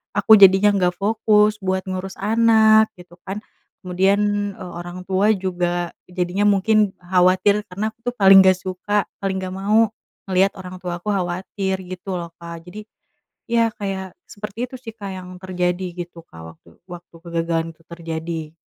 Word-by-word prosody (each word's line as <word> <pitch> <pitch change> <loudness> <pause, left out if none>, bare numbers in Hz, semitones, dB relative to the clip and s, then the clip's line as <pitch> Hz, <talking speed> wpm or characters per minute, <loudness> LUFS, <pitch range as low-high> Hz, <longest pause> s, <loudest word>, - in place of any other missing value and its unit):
aku 205 +2 +1
jadinya 195 +1 +7
gak 180 -1 +1
fokus 210 +1 +2
buat 190 -1 -1
ngurus 185 +1 -5
anak 220 0 +5
gitu 175 -1 -16
kan 205 +3 -5 0.4
kemudian, 200 +2 +1
eee, 180 - -8
orang 175 +1 -8
tua 200 +3 +3
juga 175 -2 -2 0.2
jadinya 180 +3 -1
mungkin 205 0 +3
khawatir 185 +3 +2
karena 205 +3 -3
aku 220 - -22
tuh - - -24
paling 195 0 +8
gak 185 -1 +4
suka 190 +3 -2 0.2
paling 190 -1 -1
gak 185 0 -5
mau 215 +3 +3 0.4
ngeliat 190 +1 +3
orang 185 0 -8
tuaku 175 +2 -5
khawatir 190 +1 -2
gitu 185 +1 -6
loh 170 -1 -6
Kak 170 -1 -9
jadi, 210 +3 -9 0.6
ya 230 -1 +2
kayak 190 -2 -5 0.2
seperti 210 +3 -5
itu 260 - -9
sih 225 -3 -9
Kak 200 -3 -7
yang 180 0 -9
terjadi 180 0 -2
gitu 175 -1 -7
Kak 80 - -14
waktu 85 - -23 0.2
waktu 175 -1 -11
kegagalan 165 -1 -1
itu 165 - -28
terjadi. 165 -1 -6
190 Hz, 155 wpm, -21 LUFS, 180-205 Hz, 0.6 s, paling